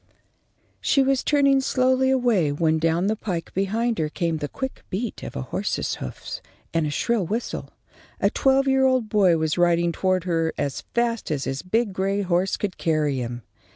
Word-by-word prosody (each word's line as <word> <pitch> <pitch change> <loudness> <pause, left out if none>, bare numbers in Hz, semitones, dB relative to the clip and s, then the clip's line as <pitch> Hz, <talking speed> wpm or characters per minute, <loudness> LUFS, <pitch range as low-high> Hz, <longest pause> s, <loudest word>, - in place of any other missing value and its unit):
She 275 - +3
was 270 -1 +1
turning 275 -2 +3
slowly 260 0 +2
away 240 - +2
when 160 +2 +1
down 165 +3 +1
the 215 +2 +1
pike 185 -6 -4
behind 220 +4 0
her 155 -1 0
came 165 0 -1
the 150 -1 -3
quick 265 - -6
beat 215 +5 -4
of - - -7
a 65 - -3
horse's - - -2
hoofs - - -7 0.3
and 165 -2 +1
a - - -2
shrill 225 +7 0
whistle. 225 +5 -3 0.5
A - - +2
twelve 270 0 +3
year 265 0 +3
old 255 -4 +2
boy 190 -6 +4
was 160 +1 -1
riding 170 0 +3
toward 185 +1 0
her 165 -2 0
as 140 -2 -2
fast 235 -1 0
as 145 -3 -1
his 135 +1 -3
big 215 +2 0
gray 195 +2 0
horse 185 +1 +1
could 200 -3 -4
carry 155 -4 +1
him. 120 -1 -5
190 Hz, 185 wpm, -24 LUFS, 160-240 Hz, 0.5 s, boy